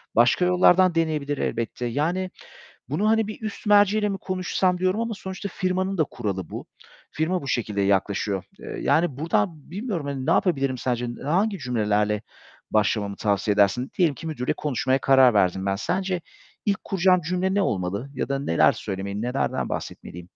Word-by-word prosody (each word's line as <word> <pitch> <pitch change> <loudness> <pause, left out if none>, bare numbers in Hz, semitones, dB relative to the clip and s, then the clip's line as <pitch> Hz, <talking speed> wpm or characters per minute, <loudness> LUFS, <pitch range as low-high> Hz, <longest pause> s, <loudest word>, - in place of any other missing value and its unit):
başka 125 +10 +4
yollardan 180 0 +5
deneyebilir 150 -3 0
elbette. 115 +1 -2
Yani 165 +10 -1 0.6
bunu 180 +11 0
hani 225 -1 +3
bir 215 - -7
üst 215 0 -6
merci 205 0 +5
ile 210 -1 +1
mi 195 -1 -3
konuşsam 185 0 0
diyorum 185 +4 +1
ama 230 -1 -2
sonuçta 190 +1 -6
firmanın 185 0 -1
da 155 - +4
kuralı 95 - -4
bu. - - -7 0.4
Firma 170 +2 -1
bu 135 - -6
şekilde 105 -5 -1
yaklaşıyor. 100 0 0
Eee, - - -7
yani 160 -5 +2
buradan 155 0 -1
bilmiyorum 195 - -3
hani 135 -2 -4
ne - - +2
yapabilirim 135 -8 +1
sence? 120 -1 -1 0.2
Hangi 195 +6 +1
cümlelerle 105 -4 0 0.5
başlamamı 105 -1 +1
tavsiye 105 0 +1
edersin? 105 +6 +2
Diyelim 165 -6 +3
ki, 165 - -9
müdürle 145 -6 -1
konuşmaya 130 -2 0
karar 130 -3 +5
verdim 95 -1 +2
ben. 95 0 +1
Sence 185 - -1 0.5
ilk 200 -2 0
kuracağım 185 -1 +3
cümle 180 +4 -1
ne 200 - +3
olmalı 100 - -2
ya - - -3
da 140 0 0
neler 110 -12 +3
söylemeli, 100 +2 -5
nelerden 125 +3 -1
bahsetmeliyim? 90 +1 -6
145 Hz, 165 wpm, -24 LUFS, -, 0.6 s, yollardan